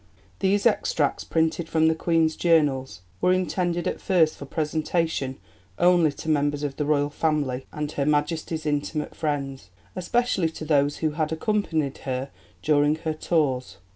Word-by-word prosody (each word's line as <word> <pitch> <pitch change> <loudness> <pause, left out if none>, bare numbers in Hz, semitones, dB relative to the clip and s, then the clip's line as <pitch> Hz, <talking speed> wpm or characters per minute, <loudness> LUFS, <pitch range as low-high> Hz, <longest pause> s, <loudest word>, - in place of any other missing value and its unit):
These 200 +2 +1
extracts, 165 -9 +1
printed 160 0 0
from 160 0 +3
the 160 - +4
Queen's 160 -1 +1
Journals, 145 - +1 0.2
were 180 - +4
intended 180 -1 0
at - - -3
first 165 -5 +3
for 140 - -9
presentation 155 -2 -1 0.4
only 175 -3 +4
to - - -9
members 145 -1 +1
of 140 -2 -3
the 150 - -1
Royal 145 -1 +1
Family 145 -5 -1
and 150 -1 -4
Her 140 - -1
Majesty's 155 +2 0
intimate 150 0 -2
friends, 140 - -3 0.3
especially 190 -2 +1
to 160 -1 -8
those 145 -1 +2
who 155 - +2
had 155 0 -2
accompanied 160 -5 -1
her 130 +1 -4 0.3
during 150 0 +3
her 160 0 -3
tours. 150 -5 -1
155 Hz, 150 wpm, -25 LUFS, 145-165 Hz, 0.4 s, the